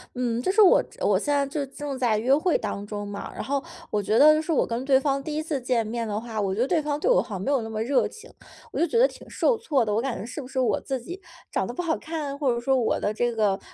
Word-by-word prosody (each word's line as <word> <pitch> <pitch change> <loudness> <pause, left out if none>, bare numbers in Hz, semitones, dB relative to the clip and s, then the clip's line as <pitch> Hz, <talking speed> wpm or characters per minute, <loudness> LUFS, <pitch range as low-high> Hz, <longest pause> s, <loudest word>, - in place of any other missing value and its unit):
嗯 240 -1 -1
就 370 - -1
是 425 +3 +4
我 385 - +7 0.2
我 - - +3
现 - - -5
在 280 -1 +2
就 280 0 -3
正 275 0 -6
在 230 -4 +2
约 245 +5 +2
会 310 +4 +3
当 200 +1 -5
中 205 -1 -5
嘛， 200 0 -6
然 - - -5
后 280 0 -1 0.3
我 210 - 0
觉 215 +2 +1
得 305 +3 +7
是 315 - -12
我 - - +3
跟 235 +3 -3
对 265 -1 +5
方 275 0 0
第 300 +1 -5
1 310 - -1
次 310 -3 -2
见 245 -2 0
面 230 +1 -3
的 210 -1 -2
话， 225 -1 -4
我 195 -2 0
觉 225 - -1
得 - - +3
对 335 -1 +2
方 295 -1 -2
对 460 +11 +1
我 - - +5
好 - - -10
像 185 - -5
没 270 - -1
有 275 -4 +2
那 225 - -6
么 220 0 -2
热 265 +3 +2
情， 440 - -13 0.4
我 - - -4
就 340 - +3
觉 465 - 0
得 485 - +7
挺 - - -6
受 485 - +2
挫 300 - +1
的。 210 -2 -1
我 220 - +1
感 260 -2 -2
觉 - - -6
是 250 +5 -6
不 255 - -9
是 265 - -9
我 255 -2 +2
自 265 -3 -4
己 355 +9 -8 0.3
长 - - -1
得 - - -5
不 355 - -3
好 330 -2 0
看， 300 -3 -5
或 270 -5 +2
者 - - -3
说 265 +2 +2
我 230 - +1
的 205 - -1
这 240 +1 -1
个 205 -3 +1
265 Hz, 330 characters per minute, -25 LUFS, 225-300 Hz, 0.4 s, 我